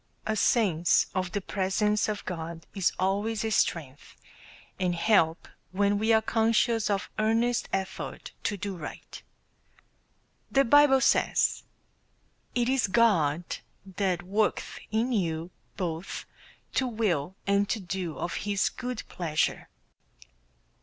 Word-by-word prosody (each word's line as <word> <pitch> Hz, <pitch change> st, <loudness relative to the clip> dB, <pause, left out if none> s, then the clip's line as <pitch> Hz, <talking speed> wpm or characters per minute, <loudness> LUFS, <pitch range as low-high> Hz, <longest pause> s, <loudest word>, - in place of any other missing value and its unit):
A 220 Hz, -, 0 dB
sense 185 Hz, -7 st, +3 dB
of 185 Hz, -1 st, -2 dB
the 200 Hz, -, -2 dB
presence 210 Hz, +3 st, 0 dB
of 210 Hz, -1 st, -4 dB
God 165 Hz, -2 st, -6 dB
is 195 Hz, -4 st, +1 dB
always 205 Hz, +4 st, 0 dB
a 220 Hz, -, -1 dB
strength, 150 Hz, -8 st, -1 dB, 0.6 s
and 180 Hz, -2 st, +1 dB
help 165 Hz, -3 st, +2 dB, 0.2 s
when 200 Hz, +2 st, +2 dB
we 220 Hz, +2 st, +2 dB
are 220 Hz, 0 st, +4 dB
conscious 225 Hz, 0 st, +2 dB
of 200 Hz, -2 st, 0 dB
earnest 225 Hz, +2 st, +1 dB
effort 190 Hz, 0 st, -4 dB
to 205 Hz, -, 0 dB
do 200 Hz, 0 st, -4 dB
right. 160 Hz, -4 st, -9 dB, 1.3 s
The 275 Hz, 0 st, +3 dB
Bible 275 Hz, +1 st, +6 dB
says: -, -, +2 dB, 0.9 s
"It 240 Hz, -1 st, +2 dB
is 260 Hz, -3 st, +2 dB
God 180 Hz, -8 st, +3 dB, 0.4 s
that 185 Hz, -2 st, -1 dB
worketh 205 Hz, +4 st, -1 dB
in 225 Hz, +4 st, 0 dB
you 170 Hz, -5 st, -1 dB, 0.3 s
both 170 Hz, -1 st, -4 dB, 0.5 s
to 260 Hz, -, +1 dB
will 190 Hz, -, -1 dB
and 200 Hz, 0 st, +2 dB
to 225 Hz, -, 0 dB
do 180 Hz, -3 st, -4 dB
of 175 Hz, -, -3 dB
his 205 Hz, -1 st, 0 dB
good 250 Hz, -2 st, -5 dB
pleasure." 160 Hz, -4 st, -1 dB
200 Hz, 125 wpm, -28 LUFS, 175-220 Hz, 1.3 s, Bible